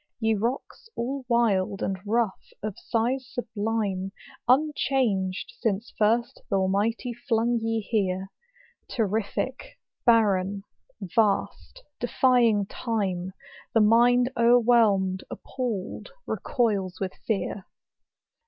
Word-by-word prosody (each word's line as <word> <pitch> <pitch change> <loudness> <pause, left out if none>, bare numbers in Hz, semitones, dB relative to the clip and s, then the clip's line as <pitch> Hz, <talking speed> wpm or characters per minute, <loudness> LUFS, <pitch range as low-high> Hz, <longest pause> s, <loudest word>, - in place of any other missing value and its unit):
Ye 225 -1 +2
rocks 235 - -3
all 260 +3 -3
wild, 200 -5 +2
and 190 -1 -2
rough, 225 -2 0
of 215 -1 -2
size 245 +3 -1
sublime, 210 -4 -2 0.3
Unchanged 255 - +1
since 220 0 -2
first 235 +4 +1
th? - - -24
Almighty 200 +5 0
flung 235 0 0
ye 225 0 0
here: 195 -3 -1 0.6
Terrific, 225 +3 -2 0.3
barren, 200 -4 +3 0.4
vast, 210 - 0 0.2
defying 240 -4 +3
time 190 -5 -2 0.4
The 225 - +6
mind 245 +3 +5
overwhelmed, 230 -6 +4
appalled, 235 -8 -5 0.2
recoils 205 -8 -1
with 190 -1 -3
fear*. 205 -2 -2
225 Hz, 95 wpm, -26 LUFS, 195-240 Hz, 0.6 s, The